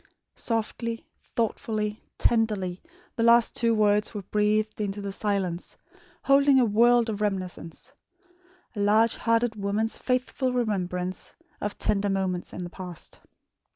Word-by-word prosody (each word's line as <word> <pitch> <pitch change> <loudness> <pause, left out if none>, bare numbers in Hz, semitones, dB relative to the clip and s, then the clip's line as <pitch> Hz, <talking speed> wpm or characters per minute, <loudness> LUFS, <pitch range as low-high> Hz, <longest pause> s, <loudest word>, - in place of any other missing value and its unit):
Softly, 230 0 -3 0.3
thoughtfully, 215 -2 -1 0.2
tenderly, 210 -6 +1 0.3
the 230 - -2
last 235 0 +5
two 230 -1 +2
words 210 +1 +2
were 205 - -4
breathed 215 +2 0
into 205 0 -2
the 200 -1 -4
silence, 195 -4 -2 0.5
holding 275 0 +5
a 250 - +4
world 235 +2 +4
of 210 -2 -3
reminiscence 190 - -4 0.8
a - - -5
large 215 +3 +4
hearted 230 0 +1
woman's 210 +2 0
faithful 255 0 -1
remembrance 185 -6 -2 0.3
of 205 0 -3
tender 205 -1 0
moments 190 -2 -1
in 180 - -6
the 175 - -6
past. 180 -3 -8
210 Hz, 125 wpm, -26 LUFS, 195-230 Hz, 0.8 s, last